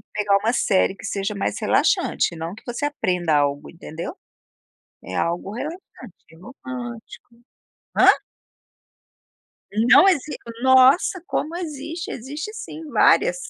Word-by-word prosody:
que - - -26
pegar 205 -1 +2
uma 220 +4 0
série 195 -5 +2
que 195 - -15
seja 200 +1 -3
mais 200 - -2
relaxante - - +1
e - - -10
não 165 +3 -5
que 220 - -15
você 240 +3 -4
aprenda 180 - 0
algo 145 -1 0
entendeu, 170 - -8 0.9
é - - -8
algo 170 +3 -2
relaxante 305 +9 -5 0.5
e - - -17
romântico. 240 - -9 0.6
Hã? - - +6 1.8
Não 285 +10 +8
exis 300 -5 0 0.3
nossa 260 +8 +5
como 315 - -2
existe, 330 +2 -6
existe 295 - -6
sim 320 -7 -8
várias, - - +4
245 Hz, 130 wpm, -22 LUFS, 190-300 Hz, 1.8 s, Não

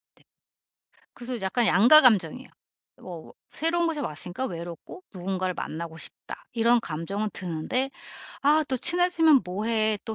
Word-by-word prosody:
넵. - - -27 0.9
그래서 245 -1 -6
약간 195 +5 +1
양가감정이에요. 235 - +5 0.5
뭐 170 -3 -10 0.2
'새로운 340 +2 0
곳에 315 -2 -2
왔으니까 175 - -4
외롭고 170 - -9
누군가를 185 0 -3
만나고 160 0 -6
싶다.' - - -8
이런 235 +1 +3
감정은 195 +4 -4
드는데 185 +10 -2 0.5
'아 300 +2 +4
또 260 - 0
친해지면 330 -1 +3
뭐 185 +4 -4
해? 220 -1 +1
또 220 - -5
220 Hz, 310 characters per minute, -26 LUFS, 180-270 Hz, 0.9 s, 양가감정이에요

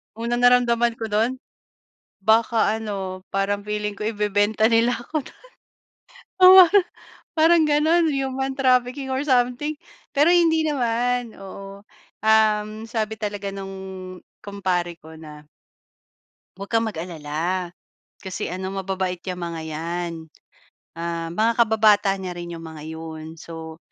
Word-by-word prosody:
Unang 235 +2 -2
naramdaman 240 -1 +4
ko 225 -1 -6
dun? 235 +6 0 0.8
Baka 220 +2 +3
ano, 190 -3 -5
parang 200 +1 -1
feeling 210 0 -3
ko 200 - -13
ibebenta 210 0 +1
nila 230 +1 +3
ako 300 +5 -4
dun. - - -22 1.0
Oo 370 0 +10
parang 405 -1 +6 0.6
parang 325 +1 +5
ganun, 315 +3 +3
human 270 -1 -2
trafficking 255 +1 +1
or 265 - 0
something, 250 +4 +1 0.4
pero 300 +5 +5
hindi 325 -2 +3
naman, 245 -4 -1
oo, 195 +1 -10 0.4
um, 215 -1 +4 0.2
sabi 220 -2 -2
talaga 205 -2 -4
nung 190 -1 -8 0.2
kumpare 185 -4 -2
ko 160 +1 -12
na 150 -1 -12 1.1
huwag 200 +1 -8
kang 225 0 +2
mag-alala, 170 -1 -3 0.5
kasi 190 -2 -5
ano 185 +2 -4
mababait 190 -1 -3
iyang 180 -1 -5
mga 170 -1 -4
iyan, 170 +2 -4 0.8
ah, 170 0 -3
mga 220 +7 +1
kababata 215 -3 +4
niya 185 -2 -5
rin 175 0 -7
iyong 165 -1 -8
mga 160 -1 -9
iyon. 160 -1 -7
So, 160 0 -9
210 Hz, 125 wpm, -23 LUFS, 185-245 Hz, 1.1 s, Oo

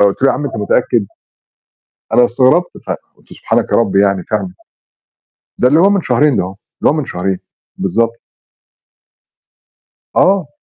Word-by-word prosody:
قُلت 100 +4 +2
له: 135 - +5
"يا 125 - +2
عم 145 - -4
أنت 130 - -4
متأكد؟" 105 0 +1 1.1
أنا 125 - +6
استغربت 130 +9 +2 0.2
فقُلت - - -8
"سبحانك - - -1
يا - - +4
رب" 100 -4 +1
يعني 100 -2 +2
فاهم؟ 100 -4 -3 1.0
ده 125 - +4
اللي 155 +5 +4
هو 195 +2 +5
من 200 -3 +1
شهرين 130 +3 +2
ده - - +1
هو، 95 - -7 0.3
اللي - - +4
هو - - 0
من 155 - -2
شهرين، 95 -3 -3 0.4
بالضبط. 115 +5 0 2.0
آه. 190 -6 +3
120 Hz, 150 wpm, -15 LUFS, 100-145 Hz, 2.0 s, أنا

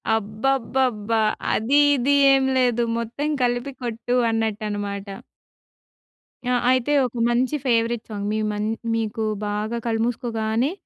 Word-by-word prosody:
అబ్బబ్బబ్బా! 225 0 0 0.3
అది 260 +7 +3 0.2
ఇది 270 +2 +1 0.2
ఏం 270 0 +3
లేదు. 245 -2 +2
మొత్తం 235 +6 -3
కలిపి 245 +3 0
కొట్టు 240 +1 -2
అన్నట్టు 220 -1 -1
అన్నమాట. 200 -1 -4 1.4
ఆ! 250 0 +1 0.2
అయితే 260 +3 +1
ఒక 245 - -6
మంచి 250 +5 +1
ఫేవరెట్ 235 -2 +1
సాంగ్, 205 -2 -4
మీ 215 - 0
మం 210 0 -2 0.3
మీకు 220 -1 -2 0.2
బాగా 210 +3 -2
కళ్ళుమూసుకోగానే 225 +2 -1
230 Hz, 115 wpm, -23 LUFS, 220-250 Hz, 1.4 s, అది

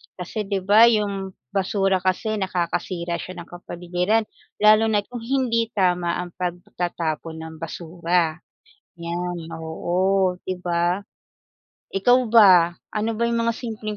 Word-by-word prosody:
Kasi 195 +3 -5
di 195 -2 -2
ba 210 +4 +7
yung 200 -4 0 0.2
basura 195 0 +1
kasi 190 +4 -1
nakakasira 175 -2 -2
siya 180 -1 -7
ng - - -21
kapaligiran, 180 +4 -1 0.4
lalo 215 +1 +6
na't 210 -1 0
kung 245 - -5
hindi 230 -1 0
tama 180 -3 +1
ang 175 - -10
pagtatapon 175 -2 -3
ng 160 0 -9
basura, 170 0 -1 0.6
yan. 170 0 -4
Oo, 180 +3 0
di 185 -1 -4
ba? 175 +1 0 1.0
Ikaw 245 +6 +5
ba 185 -6 +6 0.2
ano 215 +1 -1
ba 235 - 0
yung 235 0 +1
mga 230 - 0
simpleng 215 -3 -5
185 Hz, 130 wpm, -23 LUFS, 175-215 Hz, 1.0 s, ba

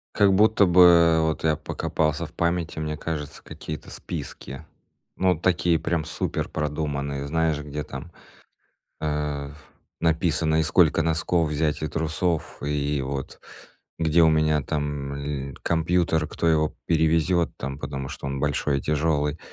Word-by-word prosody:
Как 100 -1 +5
будто 105 +1 +5
бы, 90 0 +5
э, 85 -2 +6
вот 80 0 -1
я 80 -1 +3
покопался 75 +2 -2
в 75 - -13
памяти, 85 -1 -1
мне 75 -1 -3
кажется, 75 -2 -5
какие-то 75 -1 -8
списки. 70 +4 -7 0.5
Ну, 90 -3 +2
такие 85 -2 +2
прям 80 -1 -1
суперпродуманные, 70 -2 -3
знаешь, 80 0 +1
где 75 0 -5
там, 70 +6 -8 0.9
а, 75 -2 -2 0.5
написано, 80 -1 +1
и - - +3
сколько 80 0 +4
носков 80 0 +1
взять, 75 0 -1
и 75 - -1
трусов, 80 +2 -2
и 75 -1 -1
вот 65 0 -5 0.6
где 80 0 +3
у 80 - +6
меня 75 -1 +2
там 70 0 -3
ль 70 -2 -5
компьютер, 80 -1 +1
кто 85 - -2
его 80 -1 +2
перевезёт 80 +1 +2
там, 70 +2 -5
потому 70 -1 -5
что - - -7
он 70 0 -3
большой 70 0 0
и - - -8
тяжёлый. 75 -1 0
80 Hz, 140 wpm, -25 LUFS, 75-80 Hz, 0.9 s, э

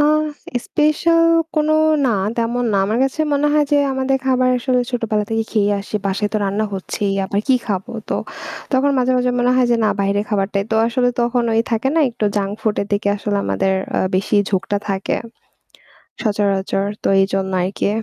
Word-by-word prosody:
আ 295 - +5 0.6
special 330 +2 +2 0.3
কোনো 305 0 +2 0.3
না - - +2 0.3
তেমন 235 +2 0
না। - - +2
আমার 220 +3 0
কাছে 270 +3 -2
মনে 285 +1 +2
হয় 300 0 +3
যে - - +5 0.2
আমাদের 265 0 0
খাবার 255 -1 +3
আসলে 250 0 +1
ছোটোবেলা 225 -4 -1
থেকেই 225 0 -1
খেয়ে 205 -2 +2
আসি। 205 +1 -4
বাসায় 200 +2 -1
তো - - +1
রান্না 200 +2 0
হচ্ছেই 195 +1 -2
আবার 200 +1 -1
কী 265 - +5
খাবো? 195 -4 -3 0.2
তো - - -1 0.6
তখন 270 +2 +3
মাঝে, 255 0 +2
মাঝে 250 0 +1
মনে 245 0 +2
হয় 255 -1 +4
যে 235 - +4
না - - +3
বাহিরে 200 +1 +1
খাবারটাই 200 -1 0
তো - - +3
আসলে 245 +1 +1
তখন 240 +1 +1
ওই 225 - +3
থাকে 230 +3 +1
না - - +5
একটু 230 - -4
জাঙ্ক 200 -1 0
ফুডের 210 -2 -1
দিকে 205 0 +1
আসলে 205 0 -2
আমাদের 190 0 0 0.3
আ - - +2
বেশিই 205 +2 +2
ঝোঁকটা 195 +1 0
থাকে 195 -1 -1 1.1
সচরাচর 200 -2 0 0.2
তো - - +1
এইজন 195 0 +1 0.2
আরকি। 190 +2 -1
220 Hz, 185 wpm, -19 LUFS, 200-255 Hz, 1.1 s, আ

